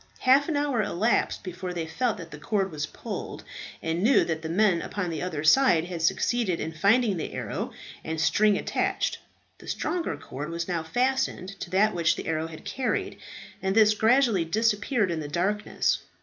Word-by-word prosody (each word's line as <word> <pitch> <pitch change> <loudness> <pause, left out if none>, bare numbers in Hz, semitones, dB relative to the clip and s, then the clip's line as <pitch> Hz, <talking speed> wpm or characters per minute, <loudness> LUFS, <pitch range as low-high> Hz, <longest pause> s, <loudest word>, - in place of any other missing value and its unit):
Half 275 +5 +4
an 305 - 0
hour 285 -5 +1
elapsed 210 +3 0
before 180 -1 -5
they 165 -2 -2
felt 225 +7 -1
that 170 -3 -9
the 150 - -9
cord 195 +3 -1
was 155 -1 -3
pulled, - - -7 0.4
and 165 +1 -1
knew 245 +7 +4
that 160 -1 -2
the 160 - -5
men 180 -1 +3
upon 185 -4 -3
the 160 - -4
other 160 -5 -3
side 170 -2 +5
had 175 -2 -5
succeeded 190 +3 +1
in 160 - -3
finding 200 +5 +3
the 160 - -4
arrow - - -4 0.3
and 160 0 -3
string 210 +5 +3
attached. - - -1 0.4
The - - -14
stronger 350 -2 -2
cord 145 +4 -7
was 170 0 -3
now 175 -3 -1
fastened 245 +1 0
to - - -6
that 205 +4 +3
which 170 -2 +2
the - - -6
arrow 160 0 -1
had 165 +4 -11
carried, 255 +5 -2 0.4
and 190 +1 0
this 215 -1 +6
gradually 225 -3 +3
disappeared 210 +3 +1
in 165 - -2
the 150 - -5
darkness. 195 +7 0
190 Hz, 185 wpm, -26 LUFS, 165-225 Hz, 0.4 s, this